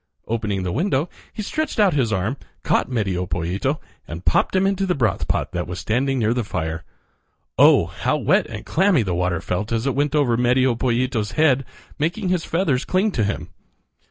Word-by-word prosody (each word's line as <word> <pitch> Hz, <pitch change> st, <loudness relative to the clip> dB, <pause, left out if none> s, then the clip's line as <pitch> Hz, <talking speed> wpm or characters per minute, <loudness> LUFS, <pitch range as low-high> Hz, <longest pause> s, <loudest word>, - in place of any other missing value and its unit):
Opening 105 Hz, -4 st, -2 dB
the 90 Hz, -, -2 dB
window 155 Hz, -, 0 dB, 0.2 s
he 215 Hz, -, -5 dB
stretched 310 Hz, +3 st, -2 dB
out 200 Hz, -4 st, +5 dB
his 130 Hz, -6 st, +1 dB
arm, 110 Hz, +6 st, -1 dB, 0.3 s
caught -, -, +1 dB
Medio 95 Hz, -7 st, -1 dB
Pollito, 90 Hz, -, -1 dB, 0.3 s
and 85 Hz, +2 st, -8 dB
popped 80 Hz, -, +2 dB
him 190 Hz, +1 st, +3 dB
into 195 Hz, 0 st, 0 dB
the 180 Hz, -, +1 dB
broth 110 Hz, -8 st, 0 dB
pot -, -, -1 dB
that 85 Hz, 0 st, -3 dB
was 90 Hz, +1 st, -5 dB
standing 130 Hz, +7 st, 0 dB
near 115 Hz, -1 st, +2 dB
the 120 Hz, -1 st, -1 dB
fire. 80 Hz, -5 st, -3 dB, 0.8 s
Oh! -, -, +7 dB
how -, -, -1 dB
wet -, -, +2 dB
and -, -, -8 dB
clammy 185 Hz, -, +3 dB
the 95 Hz, -3 st, -2 dB
water 90 Hz, -1 st, 0 dB
felt 105 Hz, +5 st, -3 dB
as 115 Hz, +1 st, 0 dB
it 135 Hz, -, +1 dB
went 145 Hz, +1 st, 0 dB
over 135 Hz, -6 st, +3 dB
Medio 125 Hz, +1 st, +3 dB
Pollito's 120 Hz, -2 st, -1 dB
head, 135 Hz, -4 st, +3 dB, 0.3 s
making 175 Hz, +6 st, -1 dB
his 180 Hz, -2 st, +1 dB
feathers 155 Hz, -7 st, 0 dB
cling 195 Hz, +3 st, +1 dB
to 115 Hz, -, 0 dB
him. 105 Hz, -, -3 dB
125 Hz, 190 wpm, -22 LUFS, 100-155 Hz, 0.8 s, Oh